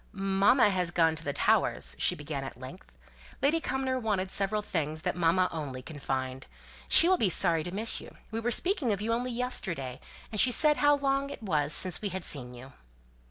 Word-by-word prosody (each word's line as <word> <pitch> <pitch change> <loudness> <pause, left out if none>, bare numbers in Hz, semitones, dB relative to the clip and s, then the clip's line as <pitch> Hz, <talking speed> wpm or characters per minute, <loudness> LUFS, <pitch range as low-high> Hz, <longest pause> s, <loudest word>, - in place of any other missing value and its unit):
"Mamma 195 +4 +3
has 180 -2 0
gone 165 -2 +2
to 160 - -8
the 145 - -2
Towers," - - +1
she - - +2
began, 145 -2 -6
at 135 -2 -9
length. 130 +9 -11 0.5
"Lady 305 +4 +2
Cumnor 265 -4 -2
wanted 200 -5 -2
several 210 +2 -1
things 155 -5 -3
that - - -1
mamma 175 +1 +2
only 135 -5 -6
can 150 +1 -10
find. 130 -1 -4 0.4
She 335 - +8
will 370 0 +3
be 210 - +2
sorry 165 -2 +1
to 175 - -6
miss 215 +4 -2
you. - - -14
We 225 - -3
were 230 +1 -2
speaking 305 - 0
of 200 - -1
you 225 +2 -1
only 245 +2 -2
yesterday, 180 - -3 0.3
and 215 - +3
she 255 - +6
said 300 +5 +3
how 290 0 +4
long 275 0 -1
it 255 - -9
was 150 -7 0
since 180 +2 +2
we 205 - -2
had 185 -1 -5
seen 125 -4 -1
you." 130 +3 -12
190 Hz, 205 wpm, -28 LUFS, 155-240 Hz, 0.5 s, She